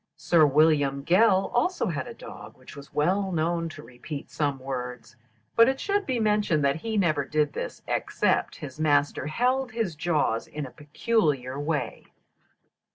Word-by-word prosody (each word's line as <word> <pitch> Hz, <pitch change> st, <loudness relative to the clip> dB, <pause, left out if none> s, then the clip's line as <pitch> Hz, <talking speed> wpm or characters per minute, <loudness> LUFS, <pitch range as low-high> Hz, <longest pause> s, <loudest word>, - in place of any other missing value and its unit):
Sir 160 Hz, -3 st, +4 dB
William 145 Hz, -2 st, +3 dB
Gell 190 Hz, +1 st, +4 dB
also 355 Hz, +6 st, +1 dB
had 150 Hz, -, -3 dB
a -, -, -9 dB
dog -, -, -11 dB
which -, -, -14 dB
was 140 Hz, 0 st, -12 dB
well 190 Hz, +6 st, +1 dB
known 165 Hz, 0 st, -1 dB
to -, -, -11 dB
repeat 140 Hz, +4 st, -8 dB
some 145 Hz, -3 st, -1 dB
words, 125 Hz, -2 st, -6 dB, 0.4 s
but 230 Hz, +2 st, +7 dB
it 265 Hz, -, -2 dB
should 405 Hz, 0 st, -1 dB
be 255 Hz, -3 st, 0 dB
mentioned 210 Hz, -9 st, +2 dB
that 140 Hz, +2 st, +2 dB
he 220 Hz, +6 st, -3 dB
never 155 Hz, -7 st, +2 dB
did 150 Hz, +1 st, 0 dB
this -, -, -6 dB
except -, -, 0 dB
his 140 Hz, 0 st, -9 dB
master 145 Hz, -2 st, +1 dB
held 250 Hz, -, 0 dB
his 220 Hz, -8 st, -2 dB
jaws 150 Hz, -8 st, 0 dB
in 150 Hz, -1 st, -5 dB
a 130 Hz, -, -10 dB
peculiar 145 Hz, -, -1 dB
way. 150 Hz, +1 st, -3 dB
155 Hz, 160 wpm, -26 LUFS, 140-210 Hz, 0.4 s, but